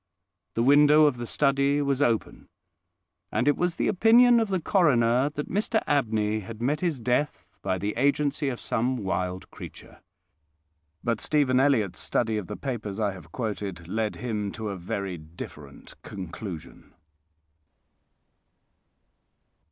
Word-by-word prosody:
The 115 Hz, -, +1 dB
window 150 Hz, +3 st, +6 dB
of 145 Hz, -4 st, +2 dB
the 120 Hz, -1 st, -5 dB
study 140 Hz, +1 st, +2 dB
was 140 Hz, -1 st, 0 dB
open, 115 Hz, -5 st, 0 dB, 0.8 s
and 125 Hz, -, 0 dB
it 145 Hz, -, +4 dB
was 175 Hz, -1 st, -1 dB
the -, -, 0 dB
opinion 235 Hz, +4 st, +6 dB
of 225 Hz, -, +1 dB
the 190 Hz, -2 st, 0 dB
coroner 135 Hz, -, +3 dB
that 150 Hz, 0 st, -5 dB
Mr 215 Hz, +3 st, 0 dB
Abney 110 Hz, -6 st, +1 dB
had 110 Hz, +2 st, -9 dB
met 140 Hz, +6 st, 0 dB
his 165 Hz, -6 st, -1 dB
death 125 Hz, +5 st, -1 dB, 0.2 s
by 95 Hz, -1 st, -1 dB
the 100 Hz, +3 st, -2 dB
agency 140 Hz, +2 st, +1 dB
of 125 Hz, -, -5 dB
some 125 Hz, +3 st, -1 dB
wild 95 Hz, -3 st, -3 dB
creature. -, -, -11 dB, 1.0 s
But 115 Hz, -2 st, -1 dB
Stephen 140 Hz, -4 st, +2 dB
Elliott's 130 Hz, -9 st, +2 dB
study 110 Hz, -2 st, 0 dB
of 95 Hz, -, -8 dB
the -, -, -6 dB
papers 110 Hz, -7 st, -4 dB
I 105 Hz, -2 st, +1 dB
have 95 Hz, -3 st, -12 dB
quoted 100 Hz, -7 st, -4 dB
led 110 Hz, +3 st, -2 dB
him 105 Hz, -5 st, -3 dB
to 110 Hz, -2 st, -5 dB
a 100 Hz, -, -4 dB
very 95 Hz, 0 st, -4 dB
different 75 Hz, -3 st, -11 dB
conclusion. 90 Hz, -2 st, -8 dB
120 Hz, 140 wpm, -26 LUFS, 100-145 Hz, 1.0 s, window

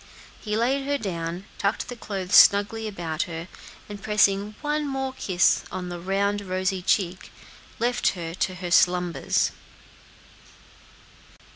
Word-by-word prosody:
He 210 Hz, -1 st, -2 dB
laid 270 Hz, +4 st, 0 dB
her 285 Hz, 0 st, +1 dB
down, 175 Hz, -4 st, -4 dB
tucked 200 Hz, +2 st, -1 dB
the 245 Hz, -, -6 dB
clothes 195 Hz, -4 st, -5 dB
snugly 205 Hz, +2 st, +6 dB
about 170 Hz, -6 st, -3 dB
her, 165 Hz, +1 st, -6 dB, 0.4 s
and 205 Hz, -1 st, -8 dB
pressing 210 Hz, 0 st, +2 dB
one 300 Hz, 0 st, -1 dB
more 265 Hz, -1 st, -3 dB
kiss 185 Hz, -7 st, +2 dB
on 185 Hz, -1 st, -5 dB
the 175 Hz, 0 st, -6 dB
round, 200 Hz, +3 st, 0 dB
rosy 185 Hz, -1 st, -2 dB
cheek, 185 Hz, -1 st, 0 dB, 0.5 s
left 245 Hz, +1 st, 0 dB
her 165 Hz, -3 st, -6 dB
to 185 Hz, +1 st, -2 dB
her 180 Hz, -1 st, -6 dB
slumbers. 180 Hz, -1 st, +2 dB
195 Hz, 130 wpm, -25 LUFS, 180-220 Hz, 0.5 s, snugly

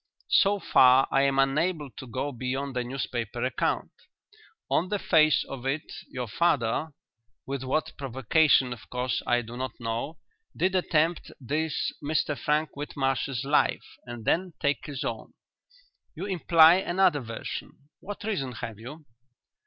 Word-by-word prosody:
"So 200 Hz, 0 st, +4 dB
far 130 Hz, -5 st, +5 dB
I 135 Hz, -, +4 dB
am 135 Hz, 0 st, +2 dB
unable 150 Hz, +2 st, +1 dB
to 130 Hz, -, -10 dB
go 130 Hz, +5 st, -3 dB
beyond 130 Hz, +2 st, -3 dB
the 125 Hz, -, 0 dB
newspaper 120 Hz, -2 st, -4 dB
account. 130 Hz, -, -1 dB, 0.8 s
On 180 Hz, +3 st, +1 dB
the 205 Hz, -, 0 dB
face 155 Hz, -5 st, +4 dB
of 135 Hz, -3 st, -8 dB
it, 145 Hz, +3 st, -2 dB, 0.2 s
your 125 Hz, -2 st, -5 dB
father 145 Hz, +1 st, 0 dB, 0.5 s
with 135 Hz, -1 st, -4 dB
what 145 Hz, +4 st, -1 dB
provocation 135 Hz, 0 st, +3 dB
of 115 Hz, -, -14 dB
course 125 Hz, 0 st, -1 dB
I 120 Hz, 0 st, +2 dB
do 115 Hz, +1 st, -9 dB
not 130 Hz, -1 st, -5 dB
know 115 Hz, +7 st, -3 dB, 0.4 s
did 185 Hz, +2 st, +1 dB
attempt 170 Hz, -2 st, +1 dB
this 150 Hz, +4 st, -2 dB
Mr 150 Hz, 0 st, 0 dB
Frank 150 Hz, +2 st, 0 dB
Whitmarsh's 135 Hz, -2 st, -2 dB
life 145 Hz, +2 st, 0 dB
and 120 Hz, -3 st, -8 dB
then 180 Hz, 0 st, +1 dB
take 145 Hz, 0 st, -1 dB
his 140 Hz, -3 st, -5 dB
own. -, -, -5 dB, 0.8 s
You 175 Hz, +4 st, -5 dB
imply 170 Hz, -3 st, +6 dB
another 185 Hz, -4 st, +2 dB
version. 115 Hz, -3 st, -6 dB, 0.3 s
What 205 Hz, +1 st, -8 dB
reason 145 Hz, -, -2 dB
have 115 Hz, -2 st, -7 dB
you?" 145 Hz, +7 st, -10 dB
140 Hz, 145 wpm, -27 LUFS, 125-160 Hz, 0.8 s, imply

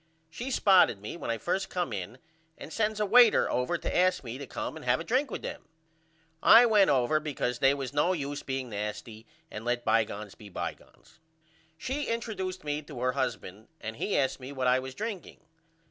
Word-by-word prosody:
She 240 Hz, +11 st, -5 dB
spotted 190 Hz, -, +4 dB
me 105 Hz, +8 st, -7 dB
when 170 Hz, -, -6 dB
I 115 Hz, -, 0 dB
first 190 Hz, -, -2 dB
come 175 Hz, -10 st, -2 dB
in 100 Hz, +5 st, -5 dB, 0.4 s
and 160 Hz, -, -9 dB
sends 215 Hz, -1 st, 0 dB
a 210 Hz, -, +2 dB
waiter 235 Hz, +2 st, +6 dB
over 125 Hz, +8 st, 0 dB
to -, -, -4 dB
ask 180 Hz, -2 st, +3 dB
me 120 Hz, +1 st, -6 dB
to 140 Hz, -, -7 dB
come -, -, -5 dB
and -, -, -9 dB
have 125 Hz, +3 st, +2 dB
a -, -, -4 dB
drink 260 Hz, -, +1 dB
with -, -, -6 dB
them. -, -, -7 dB, 0.7 s
I 230 Hz, +2 st, +8 dB
went 210 Hz, -4 st, +5 dB
over 135 Hz, +3 st, +3 dB
because 135 Hz, -5 st, -3 dB
they 135 Hz, +1 st, +4 dB
was 135 Hz, -1 st, -5 dB
no 150 Hz, +5 st, +2 dB
use 145 Hz, -4 st, -3 dB
being 130 Hz, -2 st, -4 dB
nasty 105 Hz, +2 st, -6 dB, 0.2 s
and 105 Hz, -, -7 dB
let 120 Hz, 0 st, -1 dB
bygones 105 Hz, -2 st, 0 dB
be 105 Hz, -, -13 dB
bygones. 95 Hz, -, -8 dB, 0.6 s
She 275 Hz, -, -3 dB
interduced 195 Hz, -5 st, -3 dB
me 150 Hz, 0 st, -2 dB
to 140 Hz, -4 st, -10 dB
her 125 Hz, 0 st, +2 dB
husband 110 Hz, -6 st, -4 dB
and 110 Hz, +1 st, -6 dB
he 205 Hz, -, -1 dB
asked 135 Hz, -1 st, 0 dB
me 130 Hz, +1 st, -8 dB
what 130 Hz, -2 st, -3 dB
I 125 Hz, +1 st, +4 dB
was 130 Hz, 0 st, -7 dB
drinking. 215 Hz, -4 st, -6 dB
140 Hz, 200 wpm, -29 LUFS, 120-190 Hz, 0.7 s, I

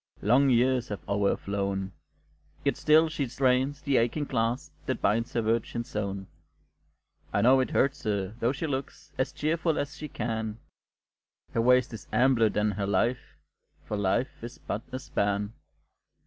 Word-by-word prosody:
Long 130 Hz, +6 st, +5 dB
years 125 Hz, 0 st, +3 dB
have 105 Hz, -, -7 dB
o'er 100 Hz, 0 st, +2 dB
her -, -, 0 dB
flown; 100 Hz, -1 st, -2 dB, 0.7 s
Yet -, -, +2 dB
still 155 Hz, +2 st, +5 dB
she 155 Hz, -3 st, -2 dB
strains 130 Hz, +3 st, +1 dB
the 140 Hz, -3 st, +2 dB
aching 120 Hz, +6 st, +1 dB
clasp 120 Hz, -1 st, -1 dB
That -, -, -1 dB
binds 115 Hz, +3 st, +1 dB
her 115 Hz, -, 0 dB
virgin 115 Hz, +1 st, 0 dB
zone; 100 Hz, -4 st, -4 dB, 1.1 s
I 100 Hz, -, +1 dB
know 130 Hz, +3 st, +6 dB
it 130 Hz, -, +1 dB
hurts 140 Hz, +2 st, +1 dB
her 100 Hz, -2 st, -1 dB
though 120 Hz, +1 st, +2 dB
she 140 Hz, +4 st, -3 dB
looks 135 Hz, -3 st, -5 dB
As 130 Hz, -, +1 dB
cheerful 160 Hz, +1 st, 0 dB
as 145 Hz, +1 st, -3 dB
she 150 Hz, +1 st, -6 dB
can; 110 Hz, -5 st, -3 dB, 1.0 s
Her 115 Hz, -, +2 dB
waist 125 Hz, 0 st, +4 dB
is 110 Hz, -, -9 dB
ampler 125 Hz, -3 st, +4 dB
than 105 Hz, 0 st, +1 dB
her 100 Hz, 0 st, -2 dB
life, 120 Hz, +4 st, 0 dB, 0.5 s
For 105 Hz, -, -3 dB
life 105 Hz, +5 st, -1 dB
is 120 Hz, +1 st, -7 dB
but 105 Hz, -, -4 dB
a 130 Hz, -, -3 dB
span. 100 Hz, -4 st, -1 dB
120 Hz, 160 wpm, -28 LUFS, 105-135 Hz, 1.1 s, know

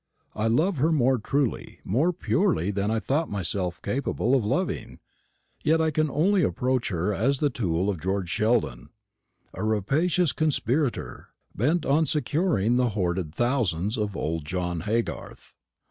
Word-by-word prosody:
I 110 Hz, +1 st, -1 dB
love 155 Hz, -, +2 dB
her 155 Hz, +5 st, +2 dB
more 130 Hz, -4 st, +3 dB
truly, 135 Hz, +3 st, -2 dB
more 140 Hz, -, +1 dB
purely 175 Hz, -, 0 dB
than 100 Hz, +1 st, -1 dB
I 110 Hz, 0 st, +1 dB
thought 150 Hz, +8 st, -1 dB
myself 95 Hz, -2 st, -3 dB
capable 130 Hz, -2 st, -1 dB
of 130 Hz, -4 st, +3 dB
loving; 105 Hz, -, -2 dB, 0.6 s
yet 160 Hz, +1 st, +3 dB
I 160 Hz, -1 st, +2 dB
can 155 Hz, +1 st, +1 dB
only 180 Hz, +8 st, +2 dB
approach 125 Hz, -, 0 dB
her 90 Hz, +2 st, -1 dB
as 130 Hz, +8 st, +1 dB
the 145 Hz, +1 st, +1 dB
tool 90 Hz, -6 st, -1 dB
of 95 Hz, -6 st, -2 dB
George 95 Hz, +1 st, -1 dB
Sheldon, 105 Hz, -, 0 dB, 0.6 s
a -, -, -5 dB
rapacious 140 Hz, -, +1 dB
conspirator, 145 Hz, -3 st, -1 dB, 0.3 s
bent 150 Hz, -, +1 dB
on 155 Hz, +3 st, +2 dB
securing 145 Hz, -, +1 dB
the 125 Hz, -1 st, +2 dB
hoarded 90 Hz, -4 st, -1 dB
thousands 110 Hz, -6 st, 0 dB
of 105 Hz, -3 st, -2 dB
old 80 Hz, 0 st, -2 dB
John 90 Hz, +2 st, -2 dB
Haygarth. 115 Hz, +2 st, -3 dB
120 Hz, 145 wpm, -26 LUFS, 95-150 Hz, 0.6 s, more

